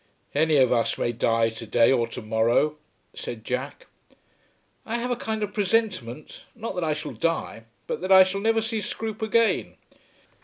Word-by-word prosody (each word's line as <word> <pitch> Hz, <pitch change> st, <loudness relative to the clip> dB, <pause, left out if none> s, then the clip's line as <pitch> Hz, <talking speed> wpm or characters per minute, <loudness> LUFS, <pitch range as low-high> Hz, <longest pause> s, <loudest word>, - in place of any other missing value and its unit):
"Any 155 Hz, +1 st, +3 dB
of 130 Hz, -2 st, +4 dB
us 115 Hz, -1 st, +1 dB
may 120 Hz, -, 0 dB
die 115 Hz, -1 st, +1 dB
to 115 Hz, 0 st, -9 dB
day 115 Hz, +3 st, +4 dB
or 120 Hz, -3 st, +2 dB
to 115 Hz, -, -8 dB
morrow," 115 Hz, +8 st, +2 dB, 0.4 s
said 110 Hz, -2 st, -7 dB
Jack. 130 Hz, +3 st, -4 dB, 1.0 s
"I 225 Hz, -, -4 dB
have 245 Hz, +1 st, -2 dB
a -, -, +1 dB
kind 220 Hz, -2 st, -3 dB
of 205 Hz, -1 st, -4 dB
presentiment, 190 Hz, -, -1 dB
not 230 Hz, 0 st, -5 dB
that 180 Hz, -2 st, -3 dB
I 155 Hz, -1 st, +1 dB
shall 150 Hz, 0 st, -6 dB
die, 165 Hz, -8 st, -2 dB, 0.2 s
but -, -, -4 dB
that 185 Hz, +1 st, -2 dB
I 190 Hz, 0 st, +10 dB
shall 195 Hz, +1 st, -3 dB
never 225 Hz, +1 st, +2 dB
see 225 Hz, -1 st, -2 dB
Scroope 220 Hz, 0 st, -5 dB
again. 225 Hz, +1 st, +1 dB
160 Hz, 180 wpm, -25 LUFS, -, 1.0 s, I